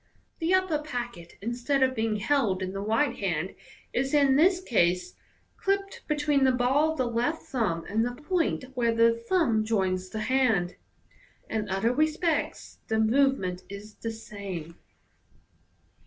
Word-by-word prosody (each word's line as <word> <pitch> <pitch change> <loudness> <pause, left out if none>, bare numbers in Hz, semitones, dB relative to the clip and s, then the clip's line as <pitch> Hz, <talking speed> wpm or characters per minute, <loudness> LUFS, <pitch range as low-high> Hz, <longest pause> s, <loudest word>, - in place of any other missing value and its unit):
The 330 +1 0
upper 370 -5 +1
packet, 240 - -6
instead 245 +4 0
of 260 0 +2
being 220 -2 0
held 210 -4 +1
in 185 0 -4
the 195 - -4
right 225 +9 +1
hand, 180 -2 -2 0.4
is 270 +4 0
in 280 -2 +5
this 360 +5 +4
case 180 - +1 0.4
clipped 395 0 -1
between 295 -2 +2
the 260 - +5
ball 265 +5 +2
of - - -9
the 255 - +1
left 240 +7 -1
thumb 200 -10 -1
and 220 +3 +1
the 245 +1 -2
point 325 -1 0
where 235 -3 +1
the 230 0 +5 0.2
thumb 275 -13 +3
joins 190 -4 0
the 215 +1 -4
hand. 225 -8 +1 0.8
In 215 -2 -2
other 195 +5 +1
respects 310 +3 -1
the 220 - 0
movement 220 -6 +2
is 205 +2 -9
the 225 - -5
same. 200 -7 -7
235 Hz, 150 wpm, -27 LUFS, 200-290 Hz, 0.8 s, in